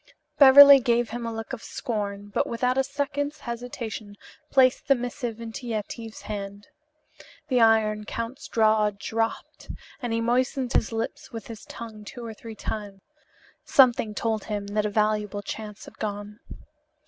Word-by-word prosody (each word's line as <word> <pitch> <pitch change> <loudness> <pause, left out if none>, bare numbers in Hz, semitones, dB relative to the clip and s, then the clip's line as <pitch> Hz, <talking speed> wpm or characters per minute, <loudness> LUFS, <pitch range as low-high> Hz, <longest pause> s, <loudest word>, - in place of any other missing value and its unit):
Beverly 280 0 +10
gave 235 -2 +1
him 235 0 -4
a - - -3
look 225 +2 -6
of 245 - -5
scorn, 205 -3 -4
but - - +1
without 250 +2 0
a 270 - +3
second's 285 +1 -3
hesitation 235 -3 -6 0.3
placed 260 -1 +3
the 275 - +5
missive 245 -2 -4
in 230 -1 -6
Yetive's 225 -1 -5
hand. 200 -1 -6 0.8
The 250 -3 +3
Iron 215 -1 +3
Count's 230 +4 -5
jaw 215 -1 +3
dropped, 225 +2 -4 0.3
and 245 -2 -3
he 230 - 0
moistened 250 +2 0
his 220 - +1
lips 225 0 -4
with 225 -3 -7
his 225 -2 -10
tongue 220 -2 -9
two 240 +3 -9
or 225 - -6
three 225 +1 -10
times. 205 -3 -6 0.6
Something 235 -5 +4
told 220 -1 -1
him 205 -2 -3
that 210 0 +1
a - - -2
valuable 210 -1 0
chance 210 0 -7
had - - -15
gone. 205 0 -5
225 Hz, 155 wpm, -26 LUFS, 210-245 Hz, 0.8 s, Beverly